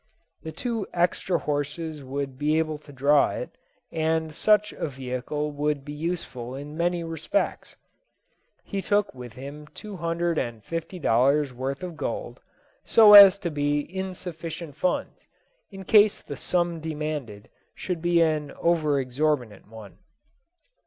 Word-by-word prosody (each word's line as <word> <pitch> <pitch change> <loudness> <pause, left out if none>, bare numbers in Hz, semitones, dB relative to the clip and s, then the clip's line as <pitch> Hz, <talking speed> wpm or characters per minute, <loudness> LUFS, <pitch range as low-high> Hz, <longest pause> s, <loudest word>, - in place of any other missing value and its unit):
The 160 - -7
two 230 +1 -3
extra 175 +1 +1
horses 150 +1 -3
would 135 0 -5
be 150 +2 +2
able 155 -2 -1
to 150 - -15
draw 140 +2 +3
it, - - -5 0.4
and 160 -1 -1
such 210 +5 +3
a - - -3
vehicle 135 +2 -4
would 145 -1 -2
be 145 - -6
useful 150 -6 -4
in 145 +2 -8
many 170 +1 0
respects. 165 +4 -2 0.9
He 200 -2 -4
took 205 +1 +1
with 125 -3 -10
him 140 +3 -9
two 210 -2 -8
hundred 170 0 -1
and 115 -3 -4
fifty 165 - -5
dollars' 140 0 +2
worth 135 +5 -4
of 175 -3 -6
gold, - - -4 0.4
so 215 -2 +7
as 200 -1 +11
to 175 -4 -4
be 145 0 0
in 190 +3 -5
sufficient 165 -3 -7
funds, 180 - -2 0.4
in 195 -2 -10
case 210 0 +5
the 145 - -7
sum 175 +3 -1
demanded 150 -9 -5 0.3
should 180 -3 -4
be 175 0 +3
an 155 -3 0
over 155 -4 +1
exorbitant 130 -5 -1
one. 110 -2 -12
155 Hz, 145 wpm, -25 LUFS, 140-175 Hz, 0.9 s, as